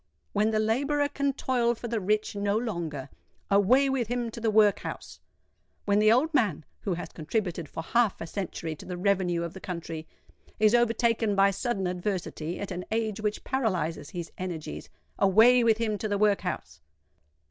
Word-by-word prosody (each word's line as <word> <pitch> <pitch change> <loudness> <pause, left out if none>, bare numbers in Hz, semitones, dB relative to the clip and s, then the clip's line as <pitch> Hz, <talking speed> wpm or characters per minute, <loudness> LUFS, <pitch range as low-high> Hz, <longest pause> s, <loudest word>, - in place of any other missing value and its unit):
When 215 +1 +2
the 220 - 0
labourer 280 +7 +1
can 280 -1 -1
toil 245 -3 +1
for 235 - -6
the 230 -1 -1
rich 210 +2 0
no 200 +1 0
longer, 170 - -3 0.4
away 230 +8 +5
with 265 -4 0
him 240 -1 -2
to 230 - -8
the 225 - +1
workhouse! 210 -1 +1 0.7
When 205 0 +3
the 215 +1 +5
old 285 +8 +3
man, 205 - +1
who 190 -4 -2
has 175 - -6
contributed 170 -1 -3
for 165 - -6
half 235 +3 +1
a - - -4
century 165 -3 -4
to - - -11
the 180 -1 -4
revenue 180 -3 +1
of 170 0 -5
the 190 - -9
country, 165 -3 -6 0.5
is 215 +1 +5
overtaken 230 -2 +2
by 195 0 +5
sudden 200 -1 -2
adversity 180 -2 -3
at 200 - -5
an 180 0 -4
age 220 -1 -1
which 210 0 -2
paralyses 185 - -1
his 175 -2 -6
energies, 175 -4 -5 0.3
away 225 +6 +6
with 225 -2 +4
him 215 -3 -1
to 215 - -2
the 205 -1 0
workhouse! 200 - 0
210 Hz, 175 wpm, -28 LUFS, 180-230 Hz, 0.7 s, away